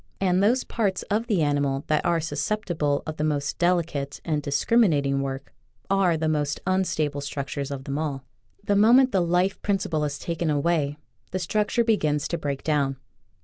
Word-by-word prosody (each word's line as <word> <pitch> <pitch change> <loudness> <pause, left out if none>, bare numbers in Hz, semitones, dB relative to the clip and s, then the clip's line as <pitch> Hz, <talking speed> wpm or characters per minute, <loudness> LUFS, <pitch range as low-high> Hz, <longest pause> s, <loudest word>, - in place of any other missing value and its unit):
And 185 -1 +2
those 240 +6 +3
parts 200 -5 -1
of 220 +3 0
the 195 -9 +2
animal 140 -1 0
that 155 -1 +1
are 170 -1 +2
susceptible 165 -4 -1
of 155 -1 -5
the 150 - -1
most 150 -1 -1
delicate 170 -6 0
and 155 -3 0
discriminating 145 -2 +2
work 135 0 -5 0.4
are 190 -4 +3
the 160 0 -1
most 150 -1 0
unstable 155 -6 0
structures 140 0 -4
of 140 -2 -5
them 140 +2 -3
all. 140 -4 -3 0.4
The 205 - +1
moment 245 +6 +6
the 190 - +2
life 180 +3 +1
principle 180 -6 0
is 145 -1 -2
taken 170 -1 -2
away 150 -1 0 0.3
the 185 - -3
structure 210 +6 0
begins 155 -10 +1
to 170 - -2
break 140 -3 -3
down. 140 -3 0
155 Hz, 170 wpm, -25 LUFS, 145-190 Hz, 0.4 s, moment